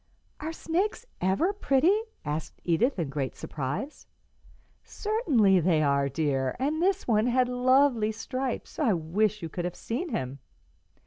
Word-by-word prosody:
"Are 315 +2 -4
snakes 370 +8 -2 0.2
ever 195 - +2
pretty?" 330 -1 +3 0.3
asked 150 +1 -4
Edith, 210 - +2
in 165 -6 -2
great 135 -2 -3
surprise. 150 - -5 0.8
"Certainly 280 - +2
they 165 -2 +2
are, 140 -1 +2
dear, 135 -2 0
and 295 +5 -1
this 380 +1 +1
one 220 -1 +3
had 250 +1 +3
lovely 250 -2 +3
stripes. 255 +6 -4
I 255 -9 +3
wish 195 +5 0
you - - -2
could 175 +2 -4
have 180 - -3
seen 315 +10 -4
him." 135 - -3
220 Hz, 140 wpm, -28 LUFS, -, 0.8 s, pretty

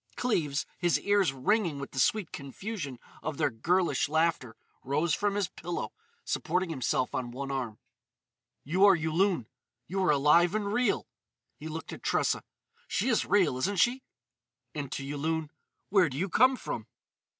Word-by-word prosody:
'" - - -29
Cleves, 160 - 0
his 175 -2 +2
ears 200 -6 +3
ringing 165 - +1
with 140 0 -6
the 130 - -4
sweet 195 - +2
confusion 145 - -6 0.2
of 155 -1 -4
their - - +1
girlish 170 +7 +1
laughter, 160 -7 +1 0.3
rose 150 +5 +1
from 205 +2 0
his 205 -3 +1
pillow, 175 0 -5 0.3
supporting 180 +1 -1
himself 130 -3 0
on 125 -2 -2
one 135 +3 -5
arm. 125 -6 -3 0.9
"You 180 +7 +1
are 200 -2 +7
Yulun. 165 - +1 0.4
You 195 +2 -2
are 185 - +2
alive 150 +6 +4
and 205 -1 -1
real——" 245 -2 +1 0.5
He 145 +6 -8
looked 160 +1 -6
at - - -9
Tressa: - - +1 0.5
"She - - 0
is 230 - +2
real, 185 -11 +3
isn't 195 +7 0
she?" 245 +7 +3 0.7
And, 145 -3 -5
to 135 - -4
Yulun: 155 +2 -2 0.4
"Where 190 -4 +4
do 130 - -6
you 190 +5 -1
come 255 +8 +5
from?" - - -5
165 Hz, 160 wpm, -29 LUFS, 140-195 Hz, 0.9 s, are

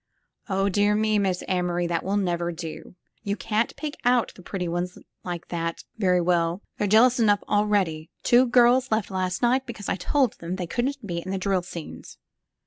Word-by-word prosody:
*'0h, 195 +1 +1
dear 205 +2 +3
me. 215 0 +2
Miss 190 -3 0
Amory, 175 -1 0
that 170 -1 -1
will 200 +2 0
never 175 -3 0
do. 165 +1 -8 0.3
You 205 -2 -2
can't 220 +1 -1
pick 305 -1 -5
out 245 -1 +2
the - - -14
pretty 180 0 -4
ones 175 +1 -3 0.3
like 175 -2 -6
that 165 -1 -3 0.2
very 180 -3 +3
well. 170 +1 +1 0.2
They're 210 - +1
jealous 235 +5 +5
enough 205 -3 +3
already. 195 -7 +1
Two 250 +2 +5
girls 245 +2 +4
left 220 -2 0
last 185 0 -2
night 260 +2 +2
because 220 -5 -6
I - - 0
told 260 +5 +1
them 170 +2 -4
they 185 -2 -3
couldn't 250 +7 -2
be 170 -3 -3
in 185 - -7
the 195 - -1
drill 190 -1 0
scenes." 170 -2 -9
195 Hz, 190 wpm, -25 LUFS, 175-220 Hz, 0.3 s, jealous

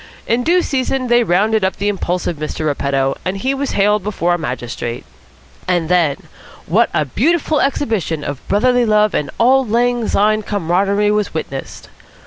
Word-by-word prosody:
In 235 +2 +1
due 350 +4 +3
season 260 -2 -1
they 240 0 +4
rounded 210 +3 +1
up 190 - 0
the 200 - -2
impulsive 180 -4 -2
Mr. 155 +1 -4
Repetto, 140 -2 0
and 185 +2 -2
he 260 +7 -1
was 275 0 -3
haled 210 +1 +2
before 180 -3 -1
a - - +1
magistrate. 120 -4 -5 0.6
And 175 -3 0
then, 165 -6 +2 0.5
what - - +2
a 150 - 0
beautiful 305 - +1
exhibition 220 - -1
of 145 -2 -5
brotherly 245 +4 +2
love 210 -1 +3
and 150 - -1
auld 255 +1 +3
lang 240 0 +1
syne 215 +1 +2
camaraderie 200 +1 0
was 210 -4 -1
witnessed! 135 -4 -6
205 Hz, 160 wpm, -17 LUFS, 165-240 Hz, 0.6 s, they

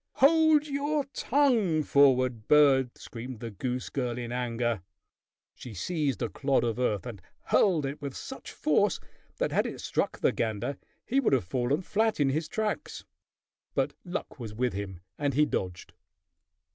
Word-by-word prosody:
"Hold 310 +1 +5
your 290 +1 0
tongue, 230 - +2
forward 130 -6 +3
bird!" 135 -4 +5
screamed 120 0 -8
the 115 0 -6
goose 125 +5 -3
girl 125 -3 -2
in 120 -1 -5
anger. 120 -3 -1 0.7
She 120 -4 -10
seized 145 - -1
a 115 - -1
clod 135 +2 +1
of 115 0 -1
earth 105 -5 0
and 115 -7 -7 0.2
hurled 170 -8 +3
it 140 +2 -5
with 140 -2 -5
such - - -8
force - - +2 0.4
that - - 0
had - - +2
it - - -7
struck - - -1
the - - +2
gander, 110 +5 -2 0.3
he 270 - +2
would 250 - +2
have 125 -9 +2
fallen 125 - 0
flat 220 +2 +1
in 140 -2 +3
his 155 +3 -1
tracks; 215 +5 -3 0.7
but - - +1
luck 180 -5 -5
was 110 -3 -6
with 125 0 0
him, 95 -3 -5 0.2
and 145 -3 0
he 150 +1 +5
dodged. 90 -10 -4
135 Hz, 160 wpm, -28 LUFS, 120-170 Hz, 0.7 s, Hold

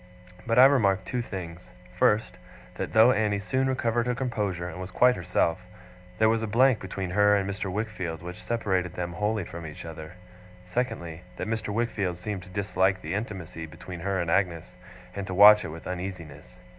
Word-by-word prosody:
But 115 0 +1
I 130 - +10
remarked 100 -9 +3
two 125 +3 -2
things: 90 -6 -7 0.3
first, 105 +2 +2 0.3
that - - -5
though 110 +3 +7
Annie 105 -3 +1
soon 130 +6 0
recovered 120 -2 0
her 125 - 0
composure, 105 -9 -2
and 90 +1 -7
was 90 - -6
quite 125 +5 +4
herself, 90 0 0 0.5
there 110 - +4
was 115 0 +2
a 115 - -2
blank 125 +2 +4
between 95 -1 -5
her 105 +2 +4
and 100 -1 0
Mr. 100 -1 -3
Wickfield 90 -6 -4
which 90 +1 -8
separated 95 -6 -1
them 85 -1 -4
wholly 105 +2 -1
from 85 +1 -8
each 75 0 -8
other; 80 0 -8 0.5
secondly, 90 -6 -3 0.2
that - - -3
Mr. 110 -1 -2
Wickfield 105 -5 -1
seemed 100 +1 -5
to 90 - -13
dislike 95 -1 0
the 80 +3 -4
intimacy 95 -6 -5
between 85 +2 -9
her 95 +2 -1
and 85 -1 -1
Agnes, 90 -2 0 0.4
and 100 -1 -4
to 95 - -4
watch 105 +2 +9
it - - -5
with 80 +1 -9
uneasiness. 85 -8 -7
95 Hz, 185 wpm, -27 LUFS, 90-110 Hz, 0.5 s, I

